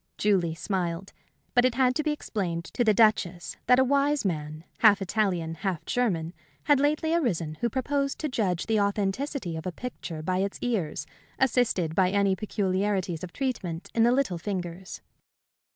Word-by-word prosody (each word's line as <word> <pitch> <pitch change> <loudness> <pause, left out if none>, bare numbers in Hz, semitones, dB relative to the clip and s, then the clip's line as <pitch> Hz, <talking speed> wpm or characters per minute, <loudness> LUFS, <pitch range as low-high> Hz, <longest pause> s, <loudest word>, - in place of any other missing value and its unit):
Julie 185 -6 +2
smiled. 180 0 -3 0.4
But 245 - +5
it 255 -2 +2
had 255 -1 +3
to 305 - 0
be 305 - -1
explained 190 - -2
to 245 - +1
the 220 - +5
Duchess 205 -5 +2
that 250 +1 +6
a 260 - +5
wise 280 0 +2
man, 155 -3 -3 0.2
half 210 -3 +6
Italian, 185 -4 0
half 180 -1 -3
German, 175 -9 0 0.3
had 290 -2 +4
lately 305 +3 +1
arisen 180 - 0
who 235 - +1
proposed 275 +3 -1
to 310 - 0
judge 195 - -1
the 220 -2 +1
authenticity 200 - -1
of 160 +2 -5
a - - -2
picture 170 -8 -6
by 185 +2 0
its 195 +1 -1
ears, 180 -12 -1 0.3
assisted 235 -10 +1
by 185 +1 +3
any 200 0 +2
peculiarities 190 -3 -1
of 180 - -6
treatment 195 -11 -3
in 230 - +2
the 235 +1 +5
little 250 -10 +1
fingers. 180 0 -5
200 Hz, 170 wpm, -27 LUFS, 175-250 Hz, 0.4 s, that